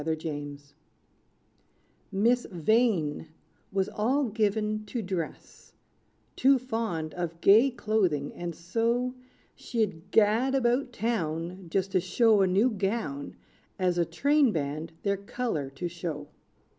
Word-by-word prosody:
=Vivy 160 +1 0
Vain= 145 -3 -5 1.5
Miss 235 +5 +2
Vain 180 -4 +1 0.4
was 195 0 +1
all 255 +5 0
given 215 0 0
to 235 +4 -4
dress 185 -6 -6 0.6
Too 270 +1 +5
fond 225 -11 -3
of 170 -2 -4
gay 220 +9 +6
clothing; 210 - 0
and 175 -1 -5
so, 230 +9 0 0.4
She'd 200 -7 -3
gad 225 +6 +3
about 250 0 +1
town 180 -5 -2
Just 190 +2 0
to 190 - +3
show 205 +4 +3
a 190 - +4
new 200 +7 +3
gown, 195 -9 -3 0.4
As 180 -2 +1
a - - +4
train 275 - +3
band 155 0 -3
their 200 -1 +1
color 200 - -3
to 135 +6 -5
show. 165 -4 -5
195 Hz, 120 wpm, -28 LUFS, 165-230 Hz, 1.5 s, gay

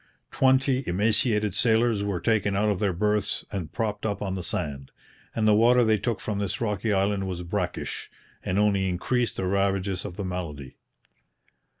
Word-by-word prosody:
Twenty 130 0 +3
emaciated 105 +2 +1
sailors 115 -1 +2
were 100 -3 -1
taken 105 -2 +1
out 105 +2 +2
of 100 -3 0
their 100 -3 +1
berths 105 +3 0
and 90 -7 -4
propped 105 -3 -2
up 105 -2 -1
on 95 -2 -3
the 95 - -3
sand. 70 -6 -3 0.5
And 110 -1 +1
the 105 - +6
water 120 +3 +5
they 110 -2 +3
took 115 +1 -1
from 105 -2 -3
this 100 -3 -2
rocky 105 -1 -1
island 100 0 +1
was 90 -1 -4
brackish, 90 0 -3 0.3
and 90 - -1
only 100 -2 +2
increased 120 +7 -1
the 95 - -1
ravages 95 0 0
of 90 -4 -7
the 100 - -3
malady. 80 -8 -6
100 Hz, 175 wpm, -26 LUFS, 95-110 Hz, 0.5 s, the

